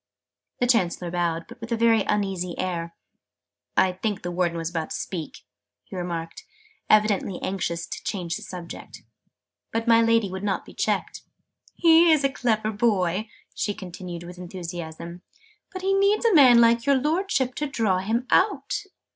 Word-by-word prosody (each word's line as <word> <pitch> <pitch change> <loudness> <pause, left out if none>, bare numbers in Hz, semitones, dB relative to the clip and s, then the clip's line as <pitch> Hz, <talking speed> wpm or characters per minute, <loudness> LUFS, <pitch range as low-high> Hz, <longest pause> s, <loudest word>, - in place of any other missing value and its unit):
The 245 - +2
Chancellor 180 -7 +1
bowed, 170 -1 -1
but 235 0 -13
with 230 +1 -7
a 230 - +1
very 225 -1 +4
uneasy 190 -4 -1
air. 170 -2 -3 0.8
"I 190 - +4
think 195 +2 -3
the 175 - -3
Warden 175 -1 0
was 165 0 -3
about 165 -2 -3
to - - -4
speak," 165 -5 -6 0.4
he - - -11
remarked, 170 -2 -5 0.5
evidently 210 -3 +3
anxious 170 -3 -2
to - - -7
change 175 -5 -3
the - - -7
subject. 175 -2 -9 0.7
But 225 +1 -2
my 230 0 +6
Lady 230 -4 +2
would 190 0 -5
not 200 -2 -1
be - - -13
checked. - - -2 0.5
"He 330 0 +6
is 305 -3 +4
a 275 - +2
clever 220 -5 0
boy," 205 -2 0 0.2
she 205 - -2
continued 180 -1 -8
with 175 +1 -10
enthusiasm, 170 -1 -7 0.5
"but 375 -1 -7
he 390 +1 +2
needs 400 +3 +3
a 455 - +4
man 255 -7 +8
like 230 +1 +4
your 280 - +5
Lordship 300 -3 0
to 295 - -3
draw 220 -9 +1
him 225 +6 -1
out!" 415 +1 +1
200 Hz, 165 wpm, -25 LUFS, 175-235 Hz, 0.8 s, man